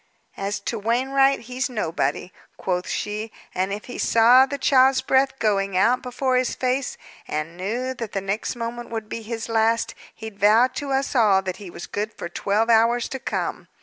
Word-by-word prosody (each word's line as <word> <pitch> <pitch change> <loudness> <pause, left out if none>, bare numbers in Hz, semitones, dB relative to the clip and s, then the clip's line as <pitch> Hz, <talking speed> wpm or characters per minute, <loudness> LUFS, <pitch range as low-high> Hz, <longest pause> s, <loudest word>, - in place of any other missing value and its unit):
"As 195 +1 -3
to 225 +2 -3
Wainwright, 270 +5 +2
he's 250 +3 -3
nobody," 185 -5 -2 0.3
quoth 180 -1 -2
she. 210 +1 -3 0.2
"And 185 +2 -1
if 205 +1 -5
he 245 - -8
saw 245 +4 +6
the 280 - -4
child's 265 -1 +4
breath 265 0 +2
going 195 -4 0
out 235 +6 +3
before 255 +1 0
his 255 -1 0
face, 255 +1 -1 0.3
and 155 +2 -4
knew 235 +8 -3
that 230 -4 -7
the 195 - 0
next 195 +6 -2
moment 240 0 -5
would 225 -2 -5
be 230 - -5
his 225 0 -5
last, 225 0 +1 0.2
he'd 220 -2 -9
vow 215 +4 +6
to 285 -2 -4
us 270 +1 0
all 205 -5 +4
that 185 -1 -4
he 200 -4 -9
was 170 - -8
good 210 +2 -3
for 170 - -7
twelve 205 +5 0
hours 230 +1 +3
to 265 - -5
come. - - -3
230 Hz, 185 wpm, -23 LUFS, 200-255 Hz, 0.3 s, saw